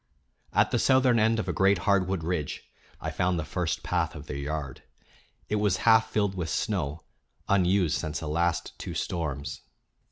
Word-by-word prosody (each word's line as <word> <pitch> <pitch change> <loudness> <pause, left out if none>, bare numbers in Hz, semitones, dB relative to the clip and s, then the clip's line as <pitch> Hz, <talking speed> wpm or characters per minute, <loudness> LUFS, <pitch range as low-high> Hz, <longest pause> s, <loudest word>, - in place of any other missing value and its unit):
At - - +3
the - - +2
southern 130 -3 +4
end 110 +1 +3
of 110 - -2
a - - -1
great 95 0 +4
hardwood 95 -3 +2
ridge 80 -3 -2 0.4
I - - -4
found 90 0 0
the 80 - -2
first 90 +1 -2
path 80 0 -1
of 75 -1 -8
their 75 - -6
yard. 70 -1 -4 0.7
It 105 - 0
was 105 -3 +2
half 110 -1 +5
filled 100 -3 +1
with 90 -4 -3
snow, 70 +2 -2 0.4
unused 95 -3 +2
since 80 -2 -3
the 80 - -5
last 85 +3 0
two - - -6
storms. 70 -5 -3
90 Hz, 170 wpm, -27 LUFS, 80-100 Hz, 0.7 s, half